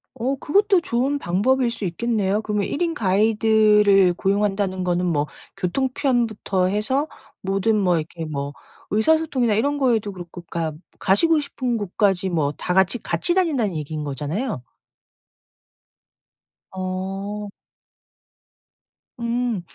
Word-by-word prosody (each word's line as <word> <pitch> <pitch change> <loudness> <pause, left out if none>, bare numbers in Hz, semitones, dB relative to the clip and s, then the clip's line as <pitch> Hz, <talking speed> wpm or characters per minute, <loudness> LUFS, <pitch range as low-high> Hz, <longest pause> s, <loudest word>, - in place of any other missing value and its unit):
어 260 +3 -1
그것도 390 +7 +2
좋은 270 0 0
방법일 240 +6 +1
수 220 - -5
있겠네요. 210 +2 0
그럼 210 -1 -1
1 285 - -3
인 340 -1 +1
가이드를 210 -2 +4
고용한다는 195 -1 0
거는 180 0 0
뭐 150 -4 +1 0.3
교통편부터 235 -3 0
해서 220 +9 0 0.3
모든 195 +3 +1
뭐 180 -3 +2
이렇게 160 +1 -6
뭐 140 -2 -4 0.4
의사소통이나 260 0 +2
이런 285 +8 +1
거에도 230 -7 +1
그렇고 175 -1 -9
그니까 165 -2 -3 0.3
가시고 315 - +3
싶은 255 -4 -2
곳까지 195 -2 0
뭐 155 -5 0
다 180 - -2
같이 190 +4 +3
같이 170 - +1
다닌다는 285 - +1
얘기인 155 0 -4
거잖아요. 150 - -3 2.1
어. 195 +2 -4 1.7
음. 235 -3 -1
205 Hz, 265 characters per minute, -22 LUFS, 185-245 Hz, 2.1 s, 가이드를